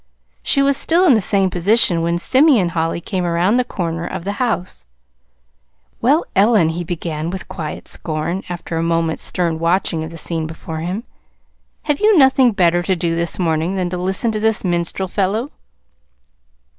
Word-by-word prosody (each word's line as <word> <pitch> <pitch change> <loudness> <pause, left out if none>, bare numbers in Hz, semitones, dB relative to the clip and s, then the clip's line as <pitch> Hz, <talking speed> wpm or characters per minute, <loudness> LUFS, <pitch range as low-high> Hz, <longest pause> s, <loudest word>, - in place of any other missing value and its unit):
She 275 - +2
was 275 0 +3
still 335 +5 +3
in 310 - +6
the 220 - +3
same 195 0 +2
position 180 -1 +3
when 170 +1 0
Simeon 260 - +3
Holly 165 0 -2
came 185 0 -3
around 175 +6 +1
the 250 - +2
corner 170 -8 -4
of 185 -2 -6
the 200 - -2
house. 185 - -2 1.2
"Well, 285 +8 +3
Ellen," 200 -4 +4
he 170 +2 -3
began, 165 -2 -4
with 190 +1 -6
quiet 155 -4 -7
scorn, 165 +4 -3
after 175 -1 -5
a - - 0
moment's 165 -1 -1
stern 170 -3 -1
watching 165 -1 0
of 160 - -6
the 165 - -10
scene 160 0 -3
before 160 0 -7
him, 180 +7 -4 0.8
"have 295 -2 0
you 425 -2 +4
nothing 265 -3 +5
better 175 -4 +2
to 190 +2 0
do 170 -1 -1
this 170 0 -2
morning 165 +1 -1
than 180 -2 -2
to 180 - -3
listen 190 +6 0
to 215 - -3
this 220 0 0
minstrel 175 +1 -1
fellow?" 205 +8 -1
180 Hz, 175 wpm, -18 LUFS, 165-215 Hz, 1.2 s, in